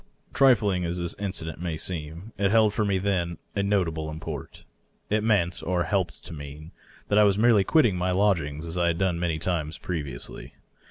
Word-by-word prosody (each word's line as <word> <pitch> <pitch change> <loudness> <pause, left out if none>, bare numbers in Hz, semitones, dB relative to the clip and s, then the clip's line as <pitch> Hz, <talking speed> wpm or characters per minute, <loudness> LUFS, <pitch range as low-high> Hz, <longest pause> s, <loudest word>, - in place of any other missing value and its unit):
Trifling 105 -9 +4
as 85 +1 -2
this 85 -1 -2
incident 85 -5 -3
may 85 -3 -3
seem, 85 +4 -5
it 100 0 +1
held 110 -1 +4
for 110 - 0
me 100 -2 +1
then 90 -3 -1 0.2
a 100 - +1
notable 85 -6 0
import. 80 +1 -7 0.5
It 105 0 +2
meant, 95 -6 +1
or 90 0 0
it - - -6
helped 95 -3 -1
to - - -7
mean, 75 +2 -9 0.4
that 105 - +4
I - - +7
was 100 -1 +3
merely 110 -2 +5
quitting 120 - +3
my 90 +1 0
lodgings 85 -6 +1
as 85 +2 -4
I 85 - +2
had 85 -1 +1
done 90 -2 0
many 85 -2 0
times 80 -1 -2
previously. 75 -9 -5
90 Hz, 195 wpm, -26 LUFS, 80-100 Hz, 0.5 s, I